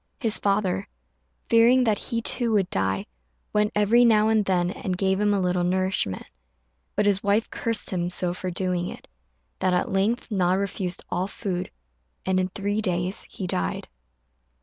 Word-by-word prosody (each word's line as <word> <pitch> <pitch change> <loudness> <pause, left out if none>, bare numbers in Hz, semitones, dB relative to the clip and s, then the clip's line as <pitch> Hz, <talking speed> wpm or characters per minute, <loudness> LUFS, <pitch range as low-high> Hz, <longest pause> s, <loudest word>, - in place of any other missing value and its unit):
His 225 -6 +3
father, 200 -2 0 0.6
fearing 235 +3 +5
that 220 -4 +1
he 230 -1 -2
too 235 -2 0
would 195 -4 +1
die, 95 0 0 0.5
went 210 0 +2
every 210 +4 +4
now 220 -2 +4
and 220 -1 +3
then 180 -2 +1
and 185 -2 -4
gave 190 +1 +1
him 210 0 +3
a 200 - +2
little 180 -1 +1
nourishment; 185 - -1 0.7
but 210 - +1
his 200 -1 +2
wife 205 +3 +1
cursed 230 -1 0
him 175 -2 -1
so 180 0 0
for 185 0 -4
doing 180 0 -1
it, - - -9 0.5
that 185 - +1
at - - -1
length 220 +6 0
Na 185 -3 +2
refused 190 -2 -2
all 180 +2 -1
food, 185 -3 -4 0.6
and 185 0 +1
in 185 - +1
three 205 +2 -2
days 180 -1 -1
he 190 - -6
died. 90 - -2
195 Hz, 170 wpm, -25 LUFS, 180-210 Hz, 0.7 s, fearing